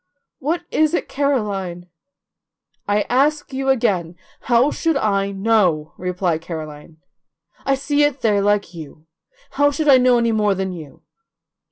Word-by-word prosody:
What 330 +5 -2
is 310 +2 +2
it, - - -2
Caroline?" 205 -11 -2 1.0
"I 205 +1 +1
ask 285 +3 0
you 270 0 -2
again, 190 -10 0 0.3
how 245 +4 +4
should 325 -3 0
I 200 -5 0
know?" 195 -7 +1
replied 180 -2 -2
Caroline. 155 -2 -8 0.7
"I 275 - +3
see 285 +2 0
it 290 -2 +1
there 210 -3 +2
like 205 -2 0
you. 155 -1 -11 0.5
How 285 0 +3
should 300 +2 -2
I 265 -2 +7
know 250 -1 +4
any 235 -1 +1
more 210 -2 +1
than 190 0 -3
you?" 155 -6 -11
210 Hz, 145 wpm, -20 LUFS, 180-275 Hz, 1.0 s, I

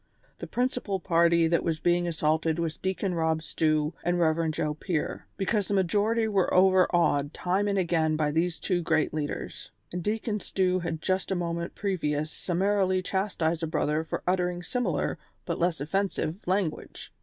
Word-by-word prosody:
The - - -6
prin 250 +1 +1
cipal 200 -8 -4
party 170 -1 +4
that 170 +1 +1
was 165 -2 -1
being 175 +1 +2
assaulted 160 0 +1
was 165 -2 -2
Deacon 190 0 -2
Eob 160 -1 +1
Stew 155 -1 +1
and 175 +1 +1
Rev. 165 -1 +2
Joe 155 -1 -1
Pier, 155 +1 -3
because 200 0 0
the 200 - 0
majority 210 +5 +2
were 195 -4 +1
over 185 0 +5
awed 145 -5 +1
time 190 +3 0
and 200 -1 0
again 165 -4 +1
by 150 -1 +1
these 165 +2 0
two 180 -2 0
great 160 -2 +1
leaders; 150 -2 -4 0.2
and 180 - -2
Deacon 210 +2 -1
Stew 185 -2 0
had 165 -2 -4
just 185 0 0
a 190 - 0
moment 170 -1 -3
previous 155 -6 -1
summarily 185 +1 +1
chastised 180 -4 -1
a 165 - -1
brother 155 0 0
for 160 - -4
uttering 180 -1 0
similar, 195 - -1 0.3
but 170 - -3
less 175 -1 +1
offensive, 185 +3 -2
language. 185 -4 -2
175 Hz, 170 wpm, -28 LUFS, 160-190 Hz, 0.3 s, over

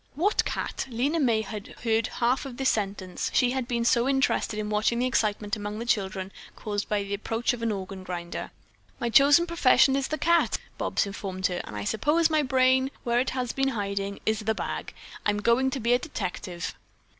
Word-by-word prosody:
"What 385 +8 +2
cat?" - - -3
Lena 270 +7 0
May 235 -6 +3
had 210 -1 -7
only - - -16
heard 225 +1 +1
half 245 +2 0
of 245 -2 -9
this 265 -1 +2
sentence; 195 -3 -3
she 245 -1 +4
had 260 -2 -2
been 235 -1 -1
so 240 +2 +3
interested 270 -5 +1
in 215 0 -3
watching 215 +3 +1
the 245 - +1
excitement 210 -4 0
among 210 0 -5
the 230 - -4
children 195 -4 -1 0.2
caused 205 -1 -4
by 205 -1 +1
the 200 0 -5
approach 225 +5 -1
of 240 - -6
an 230 -1 0
organ 190 -1 -5
grinder. 175 -2 -5 0.5
"My 240 -2 -1
chosen 285 +8 +6
profession 290 -5 +4
is 275 -1 0
the 310 - -2
cat," 340 +1 +3 0.2
Bobs - - 0
informed 195 -2 -5
her, 180 -2 0
"and 105 - -9
I 105 - -3
suppose 300 - +2
my 310 -1 +3
brain, 260 -1 +3
where 240 -1 +2
it 255 - +1
has 250 -2 -1
been 270 0 +1
hiding, 200 0 -2
is 220 0 +1
the 220 0 -1
bag. - - -5 0.3
I'm 210 0 +1
going 235 +5 +3
to 265 - -3
be 235 +1 +2
a 245 - +4
detective." 185 - -5
230 Hz, 205 wpm, -27 LUFS, 200-260 Hz, 0.5 s, chosen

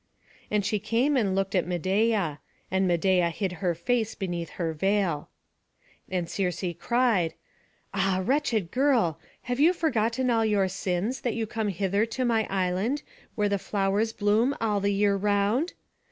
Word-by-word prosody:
And 210 -2 0
she 210 - 0
came 235 +7 +1
and 200 -7 +1
looked 195 0 -1
at 180 -3 +1
Medeia; 185 -2 +1 0.3
and 190 0 +2
Medeia 175 0 +2
hid 190 +2 -2
her 175 -3 +1
face 225 +5 -1
beneath 175 -3 -4
her 165 -2 -1
veil. 190 -2 0 0.8
And 180 -2 -1
Circe 180 +2 -2 0.2
cried, 230 -10 +1 0.6
"Ah, 190 -1 +1
wretched 240 - 0
girl, 245 - +2 0.2
have 245 +1 -3
you 325 +5 +5
forgotten 255 -6 0
all 225 -1 +3
your 205 -3 +2
sins, 190 +5 -2
that 240 - -1
you 225 -1 -1
come 220 0 -3
hither 200 +3 0
to 255 +3 -2
my 225 -2 +1
island, 195 +8 0 0.3
where 210 -1 +1
the 200 -1 0
flowers 200 +3 0
bloom 220 +5 +2
all 210 -3 +1
the 200 +1 +1
year 200 0 +2
round? 205 - +1
205 Hz, 155 wpm, -27 LUFS, 185-230 Hz, 0.8 s, you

